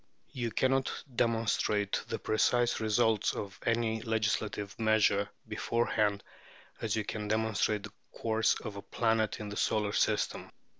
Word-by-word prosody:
You 120 -2 -2
cannot 130 +3 +1 0.2
demonstrate 115 -3 +1
the - - -2
precise 120 +2 +2
results 110 -1 +2
of 100 -2 -6
any 115 -1 +1
legislative 110 -2 -1
measure 110 -2 +3 0.2
beforehand 105 -3 0 0.6
as 110 -2 0
you 110 - 0
can 105 0 -4
demonstrate 110 -1 +1
the - - -9 0.2
course 110 -1 +1
of 105 -3 -6
a - - -5
planet 110 -1 0
in 105 -1 -5
the 105 - -6
solar 105 -1 +1
system. - - 0
110 Hz, 135 wpm, -31 LUFS, 105-115 Hz, 0.6 s, measure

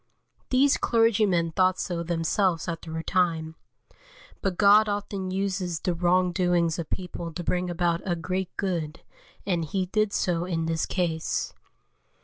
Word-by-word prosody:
These 270 +2 +4
clergymen 210 -7 +2
thought 185 +2 +2
so 175 -2 -2
themselves 170 +1 0
after 165 -1 -5
a 160 - -3
time; 165 -3 0 0.9
but 190 -3 -1
God 210 +1 +6
often 200 -2 -3
uses 185 -3 -2
the 180 - -1
wrong 180 +1 +2
doings 175 -2 +1
of 165 - -5
people 180 -2 -5
to 175 +2 -5
bring 180 +1 -1
about 170 0 0
a 175 -3 -1
great 185 +2 -3
good, 170 -5 -2 0.4
and 175 -4 0
He 185 +4 -1
did 215 +2 0
so 175 -3 0
in 165 -3 -2
this 165 0 -1
case. 170 -4 -1
180 Hz, 145 wpm, -26 LUFS, 165-190 Hz, 0.9 s, God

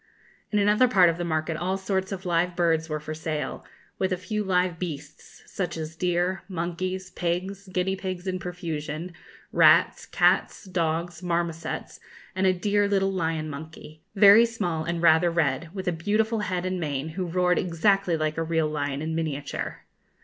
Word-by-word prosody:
In 210 - +1
another 210 +5 +4
part 190 -7 +5
of 165 +1 -2
the - - -1
market 160 -1 -1
all 185 +3 -1
sorts 190 0 -2
of 190 0 -5
live 175 0 +1
birds 165 -2 +1
were 155 0 -2
for 155 +1 -6
sale, 155 -1 -4 0.4
with 190 0 0
a 185 - +1
few 210 +4 -3
live 180 -3 +1
beasts, 150 -4 -8
such 180 -3 -4
as 160 0 -5
deer, 180 +2 0
monkeys, 185 +1 -3
pigs, 185 +3 -3
guinea 185 +1 0
pigs 185 -1 -5
in 185 -1 -2
profusion, 170 -2 -5 0.4
rats, - - +5
cats, - - +2
dogs, 170 -1 -2
marmosets, 170 -2 -3 0.4
and 190 0 +2
a - - +6
dear 205 +3 +1
little 195 -1 +1
lion 160 -3 -1
monkey, 155 +1 -9
very 205 +3 +8
small 175 -9 -2
and 170 0 -2
rather 165 +1 +5
red, 160 -1 0
with 190 -1 -6
a - - +3
beautiful 215 +7 0
head 185 -3 -2
and 185 0 -2
mane, 145 -2 -2
who 180 +3 -4
roared 180 +1 +2
exactly 180 +1 +2
like 155 0 -1
a - - +1
real 160 -1 +1
lion 145 -1 -2
in 160 +1 -2
miniature. 150 -3 -4
175 Hz, 170 wpm, -26 LUFS, 160-190 Hz, 0.4 s, very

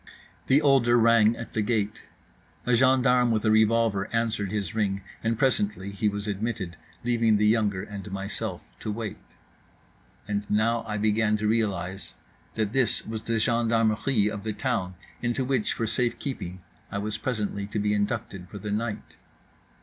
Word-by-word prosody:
The 140 +3 +5
older 130 -4 +5
rang 115 -1 +5
at 115 - -8
the 110 - +1
gate. 105 -1 -1 0.6
A 125 - +2
gendarme 125 0 +4
with 110 -2 +1
a 110 - +4
revolver 110 -2 +3
answered 115 -4 0
his 100 -5 -2
ring; 100 -3 -1 0.2
and 115 0 0
presently 105 -6 0
he 105 +2 0
was 100 +1 -4
admitted, 100 -3 -3 0.3
leaving 115 -3 +3
the 105 - +2
younger 105 -3 +2
and 100 -1 -8
myself 100 +1 -4 0.2
to 110 - -3
wait. 110 0 -5 1.1
And 100 0 -2
now 115 +2 +2
I 105 -1 -2
began 105 0 +2
to 105 0 -1
realize 95 - -1 0.4
that 110 -1 -1
this 130 -3 +1
was 110 0 -4
the 115 0 -1
gendarmerie 115 0 +2
of 105 -1 -3
the 110 -1 -2
town, 105 -7 -2 0.3
into 120 +2 0
which 130 -4 +1
for 115 - -2
safe 120 +2 0
keeping 95 -10 -5 0.3
I - - -3
was 105 +1 -3
presently 105 -5 -2
to 105 - -4
be 105 0 +1
inducted 100 -3 -2
for 100 - -8
the 105 0 -5
night. 110 +1 -3
110 Hz, 165 wpm, -26 LUFS, 100-115 Hz, 1.1 s, The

